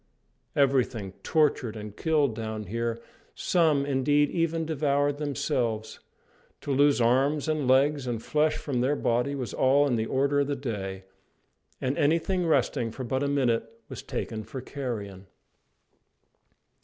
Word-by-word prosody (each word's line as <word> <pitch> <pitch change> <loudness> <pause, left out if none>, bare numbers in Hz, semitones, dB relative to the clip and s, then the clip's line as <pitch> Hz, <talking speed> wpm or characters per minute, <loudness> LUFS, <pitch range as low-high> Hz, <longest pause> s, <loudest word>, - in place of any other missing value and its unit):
Everything 130 -7 +1
tortured 145 -7 +1
and 105 -1 -8
killed 150 -5 +1
down 110 -1 -4
here, 115 +3 -3 0.4
some, 155 -5 +2
indeed, 145 +1 +2
even 165 -1 0
devoured 145 -2 0
themselves. 120 -6 -2 0.6
To 145 - -4
lose 140 +1 +4
arms 135 +6 +2
and 155 -4 0
legs 135 +1 +3
and 120 -2 -2
flesh 150 +5 +1
from 130 -5 -2
their 135 +4 +2
body 125 +2 0
was 125 -6 -4
all 140 +2 +4
in 125 -4 +1
the 110 0 -1
order 140 +2 +1
of 140 - +1
the 145 - -1
day; 100 -8 -5 0.8
and 130 +1 -1
anything 170 +4 +1
resting 130 -6 +1
for 130 +4 -7
but 130 +2 -1
a 145 - +1
minute 115 -5 0
was - - -7
taken 110 -1 -4
for 130 - -7
carrion. 110 -8 -6
135 Hz, 145 wpm, -27 LUFS, 115-145 Hz, 0.8 s, lose